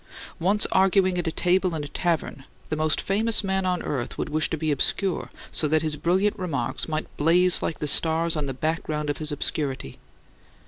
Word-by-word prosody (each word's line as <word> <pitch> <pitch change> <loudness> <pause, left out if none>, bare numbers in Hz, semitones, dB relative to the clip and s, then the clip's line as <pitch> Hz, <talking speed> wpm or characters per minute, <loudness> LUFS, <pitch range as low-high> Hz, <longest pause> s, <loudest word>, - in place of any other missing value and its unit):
Once 195 +5 +2
arguing 190 -1 +3
at 175 - -2
a - - +1
table 180 +1 +1
in 150 - -3
a - - -5
tavern 160 -4 -2 0.3
the 155 - -1
most 155 0 +1
famous 220 +3 +1
man 190 -1 0
on 180 -1 -1
earth 130 -5 -3
would - - -3
wish 155 +1 +1
to 160 - -2
be 155 0 -1
obscure, 180 +6 0 0.2
so 155 - 0
that 155 +1 +2
his 155 -1 -1
brilliant 190 +6 +1
remarks 140 -10 -2
might 155 0 -2
blaze 175 +4 +4
like 160 - -2
the - - -3
stars 165 +3 +3
on 150 -2 -2
the - - -2
background 155 0 -2
of - - -6
his 155 -1 -3
obscurity. 135 - -3
160 Hz, 195 wpm, -25 LUFS, 150-185 Hz, 0.3 s, blaze